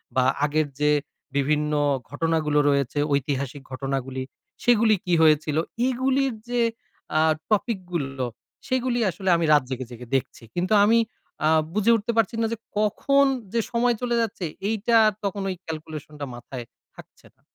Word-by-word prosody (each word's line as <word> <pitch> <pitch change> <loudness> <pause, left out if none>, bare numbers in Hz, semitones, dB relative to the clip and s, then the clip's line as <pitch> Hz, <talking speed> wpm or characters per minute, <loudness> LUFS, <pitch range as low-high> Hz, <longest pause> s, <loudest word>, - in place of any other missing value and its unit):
বা 130 - +4 0.2
আগের 150 +1 +1
যে 150 0 +3 0.4
বিভিন্ন 150 +2 +1 0.4
ঘটনাগুলো 155 +1 +1
রয়েছে, 140 0 +1
ঐতিহাসিক 140 0 -1
ঘটনাগুলি; 135 0 -3 0.4
সেগুলি 230 -2 +5
কি 180 - 0
হয়েছিল? 155 -1 +4 0.3
এগুলির 260 +1 +1 0.2
যে 245 -1 +1 0.6
আ - - +5 0.3
টপিক 215 0 +1
গুলো, 135 -5 -2 0.4
সেগুলি 255 -2 0
আসলে 190 +2 -3
আমি 165 - 0
রাত 145 - +5
জেগে, 130 -1 -4
জেগে, 120 +1 -9
দেখছি। 130 -2 -2
কিন্তু 180 +4 0
আমি 225 +3 +5 0.5
আ - - +5 0.3
বুঝে 210 +3 +3
উঠতে 225 +1 -1
পারছি 225 0 +2
না - - +2
যে, - - -4 0.2
কখন 275 +7 +3 0.3
যে 235 - +2
সময় 240 0 +2
চলে 240 -1 0
যাচ্ছে? 200 -5 -3 0.2
এইটা 225 +1 +2 0.3
তখন 200 0 -2
ওই 185 - -2
ক্যালকুলেশন 155 -1 -7
টা 140 - -3
মাথায় 120 0 -8 0.3
থাকছে - - -16
না। - - -38
165 Hz, 150 wpm, -24 LUFS, 140-230 Hz, 0.6 s, সেগুলি